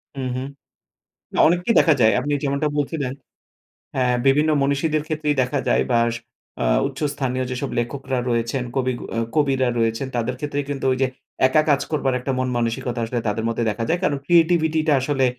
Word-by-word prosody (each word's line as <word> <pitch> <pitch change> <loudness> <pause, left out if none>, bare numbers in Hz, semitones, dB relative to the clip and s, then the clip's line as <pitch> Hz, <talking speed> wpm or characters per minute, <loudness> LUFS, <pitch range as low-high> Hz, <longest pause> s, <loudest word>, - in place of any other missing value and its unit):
উ 135 - -6 0.2
হু, 130 - -2 0.9
না - - -2
অনেককেই 180 +6 +1
দেখা 160 -3 +4
যায়। 110 -1 +5
আপনি 145 - -4
যেমনটা 140 +2 0
বলছিলেন 145 -2 -1 0.8
হ্যাঁ, 125 -1 +2
বিভিন্ন 150 +3 +4
মনীষীদের 145 +2 +1
ক্ষেত্রেই 150 -2 -1
দেখা 130 +2 0
যায় - - +3
বা 120 - +4 0.2
স - - -3 0.5
আ - - +1 0.2
উচ্চ 135 - -8
স্থানীয় 130 -2 -2
যেসব 130 +2 -3
লেখকরা 130 +1 -2
রয়েছেন 115 +2 0
কবি 130 -1 +1
গ - - -10 0.3
কবিরা 135 -3 +2
রয়েছে 115 +2 0
তাদের 120 +1 -1
ক্ষেত্রে 145 0 -3
কিন্তু 140 -1 -3
ঐযে 130 0 +1 0.4
একা 155 +3 +3
কাজ 140 -1 +3
করবার 140 -4 0
একটা 135 +2 -3
মন-মানসিকতা 120 -1 -1
আসলে 120 +1 -2
তাদের 110 +2 -1
মধ্যে 115 0 -1
দেখা 110 +2 -3
যায়। 175 +2 +1
কারণ 145 -5 +1
ক্রিয়েটিভিটিটা 160 -2 +3
আসলে 135 0 +1
135 Hz, 170 wpm, -22 LUFS, 125-150 Hz, 0.9 s, যায়